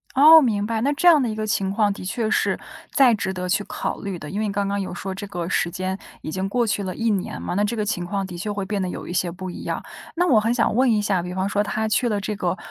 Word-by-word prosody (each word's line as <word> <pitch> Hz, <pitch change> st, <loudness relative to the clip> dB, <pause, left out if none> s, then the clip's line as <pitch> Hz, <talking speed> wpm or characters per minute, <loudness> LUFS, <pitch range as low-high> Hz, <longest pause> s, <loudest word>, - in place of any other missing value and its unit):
哦， 315 Hz, +4 st, +9 dB
明 210 Hz, -6 st, +1 dB
白。 225 Hz, 0 st, -1 dB
那 275 Hz, +4 st, +2 dB
这 355 Hz, +5 st, +1 dB
样 320 Hz, -4 st, +7 dB
的 240 Hz, -, 0 dB
一 215 Hz, -, -3 dB
个 215 Hz, 0 st, -3 dB
情 195 Hz, -2 st, 0 dB
况 205 Hz, 0 st, +2 dB
的 -, -, -9 dB
确 215 Hz, +4 st, -2 dB
是 -, -, +1 dB, 0.3 s
再 260 Hz, -4 st, +5 dB
值 190 Hz, -3 st, -2 dB
得 180 Hz, -1 st, -4 dB
去 195 Hz, +3 st, +1 dB
考 -, -, -4 dB
虑 195 Hz, -3 st, -4 dB
的， 150 Hz, -, -8 dB
因 200 Hz, +6 st, -3 dB
为 215 Hz, -, 0 dB
刚 200 Hz, 0 st, -1 dB
刚 200 Hz, 0 st, -1 dB
有 185 Hz, -, -5 dB
说 190 Hz, +2 st, -5 dB
这 205 Hz, -, -6 dB
个 175 Hz, -4 st, -4 dB
时 175 Hz, -1 st, 0 dB
间 185 Hz, +1 st, -3 dB, 0.2 s
已 -, -, -6 dB
经 190 Hz, +4 st, -2 dB
过 240 Hz, +2 st, +1 dB
去 200 Hz, -1 st, 0 dB
了 185 Hz, -1 st, -3 dB
1 230 Hz, +3 st, -1 dB
年 195 Hz, -3 st, -2 dB
嘛， -, -, -3 dB
那 200 Hz, +3 st, +1 dB
这 225 Hz, +3 st, -1 dB
个 210 Hz, -, 0 dB
情 180 Hz, -4 st, -2 dB
况 195 Hz, +1 st, -2 dB
的 180 Hz, -2 st, -8 dB
确 210 Hz, +5 st, -3 dB
会 200 Hz, -1 st, -3 dB
变 200 Hz, 0 st, -2 dB
得 185 Hz, -, -1 dB
有 -, -, -6 dB
一 -, -, -5 dB
些 180 Hz, -1 st, 0 dB
不 185 Hz, +2 st, -7 dB
一 -, -, -8 dB
样。 -, -, -3 dB, 0.3 s
那 355 Hz, +2 st, +2 dB
我 255 Hz, -, +5 dB
很 225 Hz, +2 st, +1 dB
想 230 Hz, -3 st, +1 dB
问 255 Hz, 0 st, +4 dB
一 215 Hz, -2 st, +2 dB
下， 195 Hz, -4 st, 0 dB
比 180 Hz, 0 st, -5 dB
方 190 Hz, +1 st, -1 dB
说 205 Hz, +1 st, +1 dB
他 220 Hz, +1 st, -1 dB
去 235 Hz, +3 st, +1 dB
了 210 Hz, -2 st, 0 dB
这 210 Hz, +2 st, -3 dB
个 185 Hz, -2 st, -1 dB
205 Hz, 325 characters per minute, -23 LUFS, 185-220 Hz, 0.3 s, 哦